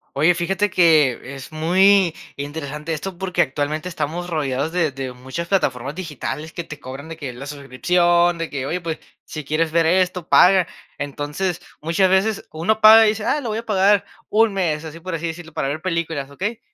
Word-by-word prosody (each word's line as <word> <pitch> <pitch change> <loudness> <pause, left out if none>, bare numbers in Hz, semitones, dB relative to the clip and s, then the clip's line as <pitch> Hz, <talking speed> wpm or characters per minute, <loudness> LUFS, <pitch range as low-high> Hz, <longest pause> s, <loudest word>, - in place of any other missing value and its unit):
Oye, 165 +5 +4
fíjate 195 +4 0
que 150 -7 +3
es 135 +3 -10
muy 185 +2 +4 0.2
interesante 150 +2 -5
esto 175 +3 -5
porque 180 -2 0
actualmente 150 +3 -2
estamos 170 +1 -4
rodeados 145 -1 -1
de 165 -5 +1
de 130 -1 -5
muchas 130 +7 -6
plataformas 140 -7 0
digitales 155 -3 -5
que 170 - -6
te 155 -2 -10
cobran 135 +4 -8
de 165 - -7
que 140 -5 -6
la 125 +3 -9
suscripción, 170 +5 +1
de 165 -1 -4
que: 135 -2 -4
"Oye, 180 +4 -2
pues, 165 -2 -4 0.2
si 155 -2 -7
quieres 155 +2 0
ver 165 0 +3
esto, 180 0 +1
paga". 185 -1 +6 0.3
Entonces, 150 +5 -3 0.2
muchas 170 +4 +2
veces 195 +3 +1
uno 185 +8 0
paga 220 +1 +9
y - - +4
dice: 215 0 -2
"Ah, 295 - +1
lo 245 -6 -4
voy 215 - -2
a 230 - -9
pagar, 200 -1 +3 0.3
un 220 0 +3
mes", 165 -5 -1
así 160 +1 -8
por 180 0 -5
así 165 +1 -3
decirlo, 165 0 -8
para 135 - -1
ver 155 +2 -4
películas, 165 -6 -2
¿okey? 205 +10 -4
165 Hz, 195 wpm, -21 LUFS, 145-185 Hz, 0.3 s, paga